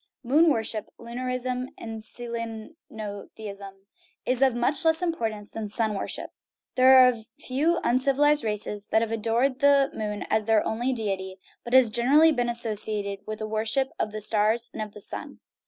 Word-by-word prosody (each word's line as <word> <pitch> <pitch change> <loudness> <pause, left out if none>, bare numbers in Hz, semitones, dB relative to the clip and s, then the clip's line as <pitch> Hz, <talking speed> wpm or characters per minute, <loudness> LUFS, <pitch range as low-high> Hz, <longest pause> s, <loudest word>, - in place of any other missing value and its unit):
* - - -64
Moon 300 +7 +4
worship 225 -4 -2
(lunarism 250 +1 -4
and 225 -1 -7
selenotheism) 215 - -8 0.4
is 255 0 0
of 265 -3 +4
much 245 +6 0
less 320 +2 +2
importance 220 -11 -3
than 220 -2 -5
sun 220 +1 0
worship. 195 - -5 0.4
There 260 +1 +7
are - - +6
a 235 -3 -4
few 300 +7 0
uncivilized 275 +3 +2
races 210 -1 -3
that 220 - +2
have 225 - -4
adored 235 +4 0
the 280 -1 +4
moon 210 -1 -4
as 220 -1 +1
their 220 -1 +3
only 240 +4 -1
deity, 195 -5 -3 0.3
but 240 +2 -1
it - - +11
has 245 -4 +4
generally 285 +8 +5
been 245 -4 0
associated 215 -3 0
with 215 0 -5
a 215 - -3
worship 220 +5 0
of 215 - -1
the 215 0 -5
stars 220 +3 +2
and 215 -1 -5
the 210 - -11
sun. - - -5
230 Hz, 170 wpm, -26 LUFS, 215-255 Hz, 0.4 s, it